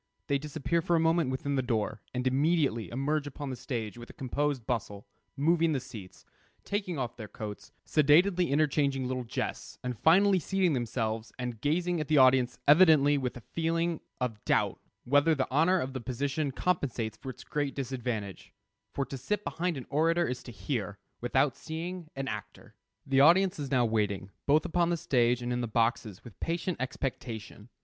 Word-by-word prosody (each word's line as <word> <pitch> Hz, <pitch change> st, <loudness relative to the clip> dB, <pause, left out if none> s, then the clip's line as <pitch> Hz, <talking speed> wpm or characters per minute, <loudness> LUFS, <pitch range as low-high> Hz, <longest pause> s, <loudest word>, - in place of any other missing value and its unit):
They 140 Hz, -1 st, +1 dB
disappear 155 Hz, +3 st, -1 dB
for 170 Hz, +1 st, +1 dB
a -, -, +3 dB
moment 165 Hz, -2 st, +2 dB
within 130 Hz, +2 st, -2 dB
the 135 Hz, -, +2 dB
door, 115 Hz, -3 st, -1 dB
and 125 Hz, 0 st, -3 dB
immediately 135 Hz, -3 st, +1 dB
emerge 145 Hz, +4 st, -1 dB
upon 145 Hz, 0 st, -6 dB
the -, -, -4 dB
stage 120 Hz, -2 st, -5 dB
with 120 Hz, -, -10 dB
a -, -, -11 dB
composed 135 Hz, -1 st, -2 dB
bustle, 105 Hz, -4 st, -3 dB, 0.3 s
moving 165 Hz, +2 st, +3 dB
the 135 Hz, -, 0 dB
seats, 110 Hz, -8 st, -11 dB, 0.4 s
taking 200 Hz, -5 st, -2 dB
off 125 Hz, -3 st, -3 dB
their 110 Hz, -3 st, -7 dB
coats, 105 Hz, 0 st, -8 dB
sedately 170 Hz, +5 st, +4 dB
interchanging 140 Hz, -2 st, +1 dB
little 130 Hz, 0 st, -2 dB
jests, -, -, -4 dB
and 125 Hz, -1 st, -3 dB
finally 190 Hz, +4 st, +5 dB
seating 185 Hz, 0 st, +1 dB
themselves, 115 Hz, -3 st, -2 dB
and 125 Hz, -3 st, -5 dB
gazing 170 Hz, +4 st, 0 dB
at 150 Hz, -, -4 dB
the 155 Hz, -, +3 dB
audience 130 Hz, -2 st, +5 dB
evidently 150 Hz, -2 st, +6 dB
with 125 Hz, -2 st, -3 dB
a 120 Hz, -, -12 dB
feeling 165 Hz, 0 st, 0 dB, 0.2 s
of 115 Hz, -5 st, -3 dB
doubt -, -, +1 dB, 0.2 s
whether 145 Hz, +5 st, +4 dB
the 135 Hz, -2 st, 0 dB
honor 165 Hz, +7 st, +4 dB
of 130 Hz, -3 st, -3 dB
the 130 Hz, -, -4 dB
position 135 Hz, +4 st, -2 dB
compensates 125 Hz, -, -1 dB
for 135 Hz, -, -8 dB
its 130 Hz, -, -9 dB
great 145 Hz, -2 st, -2 dB
disadvantage; 120 Hz, -7 st, -4 dB, 0.4 s
for 140 Hz, -, -1 dB
to 135 Hz, -, -7 dB
sit 205 Hz, +11 st, -2 dB
behind 175 Hz, -2 st, -2 dB
an 130 Hz, -, -7 dB
orator 165 Hz, +4 st, +2 dB
is 125 Hz, 0 st, -3 dB
to 125 Hz, -, -10 dB
hear, 100 Hz, -1 st, -3 dB, 0.2 s
without 130 Hz, +2 st, +2 dB
seeing, 170 Hz, +2 st, -6 dB
an 135 Hz, 0 st, -3 dB
actor. 105 Hz, -4 st, -7 dB, 0.3 s
The 135 Hz, 0 st, +3 dB
audience 185 Hz, +5 st, +5 dB
is 140 Hz, -2 st, -4 dB
now 125 Hz, -3 st, +3 dB
waiting, 105 Hz, -3 st, -1 dB, 0.2 s
both 150 Hz, +2 st, +4 dB
upon 170 Hz, 0 st, +1 dB
the 170 Hz, -, +1 dB
stage 125 Hz, -4 st, +2 dB
and 120 Hz, 0 st, -1 dB
in 125 Hz, -, -1 dB
the 120 Hz, -, -2 dB
boxes, 115 Hz, -3 st, 0 dB
with 120 Hz, -5 st, -13 dB
patient 170 Hz, +1 st, -2 dB
expectation. 120 Hz, -4 st, -5 dB
135 Hz, 180 wpm, -30 LUFS, 120-160 Hz, 0.4 s, evidently